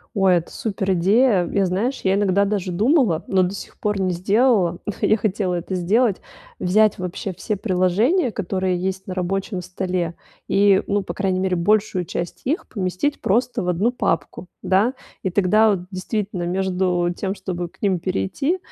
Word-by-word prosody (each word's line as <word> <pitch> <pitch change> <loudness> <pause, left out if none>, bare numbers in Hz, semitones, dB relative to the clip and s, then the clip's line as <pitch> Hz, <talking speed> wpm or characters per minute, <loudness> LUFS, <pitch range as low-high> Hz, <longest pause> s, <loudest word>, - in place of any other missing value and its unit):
О, 195 -2 +3
это 175 -2 +2
супер 195 -3 -2
идея. 195 +2 +3
Я, 200 -1 +2
знаешь, 210 +9 -1
я 190 0 +2
иногда 200 0 +2
даже 195 -3 -2
думала, 215 - +2
но 190 -1 +3
до 180 - -1
сих 200 - -9
пор 210 -2 -1
не 185 -1 +1
сделала, 195 -1 +2
ну, 210 - -2
я 215 - +3
хотела 200 -3 -1
это 175 +2 -3
сделать- 200 +4 +2 0.4
взять 210 +3 +3
вообще 180 +1 -4
все 210 +4 -3
приложения, 215 - +1
которые 185 -2 -1
есть 190 +1 -3
на 185 - -5
рабочем 190 +1 -2
столе 180 -1 -3 0.3
и, 200 -1 +4
ну, 205 0 0
по - - -5
крайней 190 -2 0
мере, 185 -1 0
большую 200 +1 +1
часть 170 +2 -5
их 305 +7 -1
поместить 195 +7 -2
просто 240 +4 +1
в 180 - -2
1 195 +8 +1
папку, 200 -5 -2 0.2
да, 195 +7 +2 0.3
и 190 - -1
тогда, 205 +4 +3
вот, 195 - 0
действительно, 190 -1 -3
между 180 -1 0
тем, 195 +1 -3
чтобы 175 -3 -4
к - - -28
ним 190 -4 +2
перейти, 175 - -1
190 Hz, 175 wpm, -21 LUFS, 180-210 Hz, 0.4 s, и